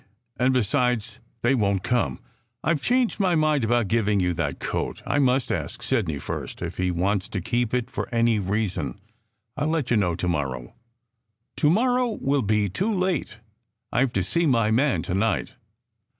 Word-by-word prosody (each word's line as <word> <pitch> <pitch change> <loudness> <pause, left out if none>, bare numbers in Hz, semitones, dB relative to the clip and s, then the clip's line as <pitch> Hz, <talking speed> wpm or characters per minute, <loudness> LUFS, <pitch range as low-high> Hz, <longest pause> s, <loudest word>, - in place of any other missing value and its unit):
And 130 0 +2
besides, 125 -2 0 0.2
they 120 +3 +4
won 100 -6 +2
t 95 - -3
come. 120 - 0 0.4
I 165 - +3
ve 155 - -1
changed 245 - +1
my 185 -3 +3
mind 155 -4 +2
about 120 -1 +2
giving 105 -2 +2
you 90 -1 +1
that 75 -4 -2
coat. - - -3
I 145 - +1
must 130 -1 +2
ask 120 0 -3
Sidney 110 - 0
first - - -5
if - - -5
he 90 0 +1
wants 95 +2 0
to 100 - -3
keep 120 +5 -1
it 125 0 -1
for 135 - -4
any 115 -2 +2
reason. 100 0 -2 0.6
I 145 - -1
ll - - 0
let 155 -6 -1
you 120 - +4
know 90 -5 +1
to 90 +1 -3
morrow." 65 -7 -2 0.8
"To 150 - +3
morrow 245 +4 +2
will 140 0 +1
be 105 -1 +1
too 190 - -1
late. 185 - -1 0.5
I 125 - +3
ve 130 - -4
to 95 - +1
see 170 - +1
my 115 -5 +3
man 130 +5 +2
to 90 - -3
night." 100 0 0
120 Hz, 190 wpm, -25 LUFS, 100-140 Hz, 0.8 s, they